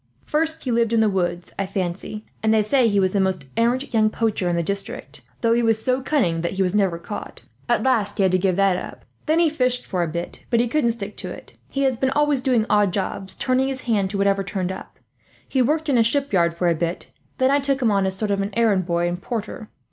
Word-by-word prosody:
First 320 Hz, +1 st, +1 dB
he 255 Hz, -, -2 dB
lived 230 Hz, -1 st, +1 dB
in 230 Hz, -, +4 dB
the 220 Hz, -, +4 dB
woods, 175 Hz, -2 st, -2 dB
I 195 Hz, -, -1 dB
fancy; 190 Hz, +3 st, -4 dB, 0.2 s
and 220 Hz, -, +2 dB
they 220 Hz, -1 st, +4 dB
say 250 Hz, +3 st, +3 dB
he 205 Hz, -2 st, +2 dB
was 185 Hz, -1 st, +1 dB
the 200 Hz, -, +2 dB
most 190 Hz, -6 st, 0 dB
arrant 240 Hz, +4 st, 0 dB
young 215 Hz, -1 st, +4 dB
poacher 215 Hz, -5 st, -1 dB
in 175 Hz, -, 0 dB
the 170 Hz, -, 0 dB
district, 200 Hz, +3 st, -4 dB, 0.2 s
though 230 Hz, -1 st, +3 dB
he 235 Hz, -, +2 dB
was 225 Hz, -1 st, +2 dB
so 255 Hz, +3 st, 0 dB
cunning 205 Hz, -, +1 dB
that 170 Hz, -, -2 dB
he 190 Hz, 0 st, +1 dB
was 180 Hz, 0 st, 0 dB
never 195 Hz, -5 st, +2 dB
caught. 205 Hz, +5 st, -8 dB, 0.3 s
At -, -, +2 dB
last 225 Hz, -6 st, +1 dB
he 200 Hz, -, +2 dB
had 190 Hz, -, +3 dB
to 185 Hz, -, +2 dB
give 185 Hz, -1 st, +1 dB
that 195 Hz, -1 st, +3 dB
up. -, -, -8 dB, 0.2 s
Then 315 Hz, +2 st, +3 dB
he 340 Hz, -1 st, +4 dB
fished 250 Hz, -5 st, 0 dB
for 185 Hz, -3 st, -2 dB
a 170 Hz, -, 0 dB
bit, 170 Hz, +2 st, -6 dB
but 235 Hz, -, +2 dB
he 240 Hz, -, +2 dB
couldn't 235 Hz, -2 st, +1 dB
stick 210 Hz, -2 st, -7 dB
to -, -, -5 dB
it. -, -, -10 dB, 0.2 s
He 275 Hz, -, -1 dB
has 260 Hz, -3 st, +1 dB
been 265 Hz, +2 st, +1 dB
always 295 Hz, -1 st, +2 dB
doing 250 Hz, -5 st, +2 dB
odd 205 Hz, -2 st, +3 dB
jobs, 195 Hz, 0 st, -3 dB
turning 260 Hz, 0 st, +1 dB
his 265 Hz, -1 st, -3 dB
hand 210 Hz, -6 st, 0 dB
to 200 Hz, -, -3 dB
whatever 195 Hz, 0 st, +2 dB
turned 190 Hz, -1 st, -3 dB
up. 190 Hz, -, -9 dB, 0.5 s
He 265 Hz, -, +1 dB
worked 305 Hz, +5 st, +1 dB
in 265 Hz, -5 st, +3 dB
a -, -, +6 dB
shipyard 205 Hz, -10 st, +1 dB
for 175 Hz, -, +1 dB
a 170 Hz, -, +4 dB
bit, 170 Hz, +2 st, -3 dB, 0.3 s
then 260 Hz, +1 st, +3 dB
I 285 Hz, -, +4 dB
took 275 Hz, -1 st, 0 dB
him 235 Hz, -5 st, +2 dB
as 195 Hz, -1 st, +2 dB
a 190 Hz, -, -4 dB
sort 210 Hz, 0 st, -1 dB
of 200 Hz, 0 st, +1 dB
errand 205 Hz, -6 st, +2 dB
boy 170 Hz, 0 st, +1 dB
and 175 Hz, +1 st, -3 dB
porter. 225 Hz, -2 st, -5 dB
215 Hz, 255 wpm, -22 LUFS, 190-255 Hz, 0.5 s, a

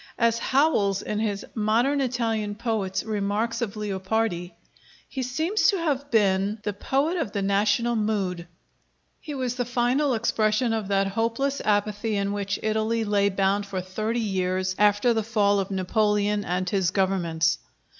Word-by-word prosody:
As 230 Hz, -1 st, +2 dB
Howells 235 Hz, -9 st, +2 dB
in 210 Hz, -, -2 dB
his 205 Hz, -2 st, -2 dB
'Modern 235 Hz, +6 st, +1 dB
Italian 225 Hz, -5 st, -1 dB
Poets' 210 Hz, -4 st, -2 dB
remarks 215 Hz, +2 st, -1 dB
of 225 Hz, -3 st, -3 dB
Leopardi: 190 Hz, -3 st, -2 dB, 0.5 s
"He 265 Hz, -, -5 dB
seems 315 Hz, -, +1 dB
to 395 Hz, -, +3 dB
have 285 Hz, -5 st, -1 dB
been 205 Hz, -2 st, +2 dB
the 210 Hz, -, -2 dB
poet 280 Hz, -, 0 dB
of 265 Hz, -, -3 dB
the 200 Hz, -2 st, -1 dB
national 205 Hz, +4 st, +2 dB
mood; 195 Hz, -5 st, -1 dB, 0.7 s
he 295 Hz, -, -7 dB
was 255 Hz, -2 st, -2 dB
the 245 Hz, -, +1 dB
final 250 Hz, +3 st, +1 dB
expression 220 Hz, +1 st, +1 dB
of 220 Hz, -3 st, -2 dB
that 195 Hz, 0 st, +2 dB
hopeless 230 Hz, +7 st, -1 dB
apathy 210 Hz, +1 st, 0 dB
in 200 Hz, 0 st, -1 dB
which 200 Hz, -1 st, -2 dB
Italy 220 Hz, +1 st, 0 dB
lay 205 Hz, -1 st, +2 dB
bound 195 Hz, +1 st, 0 dB
for 195 Hz, -1 st, -3 dB
thirty 215 Hz, +6 st, -2 dB
years 185 Hz, -3 st, -1 dB
after 210 Hz, +3 st, +4 dB
the 225 Hz, -, +1 dB
fall 205 Hz, -2 st, +2 dB
of 195 Hz, -, -2 dB
Napoleon 205 Hz, +2 st, +1 dB
and 180 Hz, +1 st, -1 dB
his 190 Hz, -2 st, +1 dB
governments." 170 Hz, -4 st, +1 dB
210 Hz, 155 wpm, -25 LUFS, 195-235 Hz, 0.7 s, after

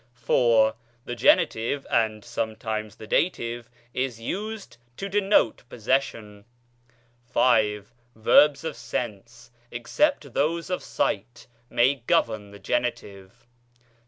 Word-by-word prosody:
IV. 115 Hz, -2 st, +3 dB, 0.3 s
The 120 Hz, -, -4 dB
genitive 120 Hz, +3 st, +2 dB
(and 110 Hz, -2 st, 0 dB
sometimes 110 Hz, -1 st, -4 dB
the -, -, -11 dB
dative) 120 Hz, -4 st, -1 dB, 0.2 s
is 130 Hz, -3 st, -2 dB
used 205 Hz, -, -5 dB, 0.2 s
to 195 Hz, -, -4 dB
denote 195 Hz, -, +2 dB
pos 115 Hz, -, -12 dB
session. 110 Hz, -5 st, -1 dB, 0.9 s
V. 110 Hz, -4 st, +3 dB, 0.3 s
Verbs 140 Hz, +7 st, +5 dB
of 160 Hz, -2 st, -4 dB
sense, 115 Hz, 0 st, -6 dB, 0.2 s
except 140 Hz, -, 0 dB
those 165 Hz, +4 st, 0 dB
of 180 Hz, -, -1 dB
sight, 110 Hz, +5 st, -2 dB, 0.2 s
may 130 Hz, +2 st, +2 dB
govern 110 Hz, -3 st, +1 dB
the 100 Hz, -, -12 dB
genitive. 100 Hz, -5 st, -4 dB
120 Hz, 105 wpm, -25 LUFS, 110-140 Hz, 0.9 s, Verbs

